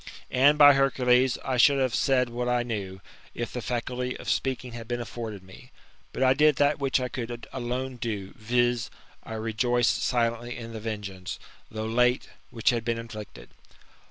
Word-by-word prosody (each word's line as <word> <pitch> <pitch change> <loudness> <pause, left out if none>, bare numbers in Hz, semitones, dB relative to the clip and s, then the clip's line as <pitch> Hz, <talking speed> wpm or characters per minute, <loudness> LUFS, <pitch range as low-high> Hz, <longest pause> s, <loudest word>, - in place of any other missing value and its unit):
And, 140 +4 +5
by 145 -1 +9
Hercules, 130 -2 +3
I 130 -2 0
should 140 +3 +6
have 130 -3 +1
said 125 -3 +2
what 120 +1 -2
I 125 0 +2
knew, 100 -5 -5 0.3
if 120 - -4
the 125 - -3
faculty 125 +1 -3
of - - -11
speaking 130 -2 -2
had 115 -1 -8
been 120 0 -2
afforded 110 -4 -6
me. 95 0 -15 0.2
> - - -34
But - - -1
I 130 0 +5
did 150 +1 +4
that 145 +2 +2
which 135 -1 +1
I 125 - -2
could 120 -1 -6
alone 130 0 -3
do, 105 -5 -4
viz. 120 +2 0 0.3
I 115 - -9
rejoiced 115 +2 +1
silently 120 0 0
in 115 -1 -8
the 110 - -5
venegeance, 100 -4 -5 0.3
though 110 0 -4
late,, 125 +2 +2 0.2
which 115 +2 +2
had 120 -2 -2
been 115 0 -1
inflicted. 105 - -9
120 Hz, 180 wpm, -27 LUFS, 115-130 Hz, 0.3 s, by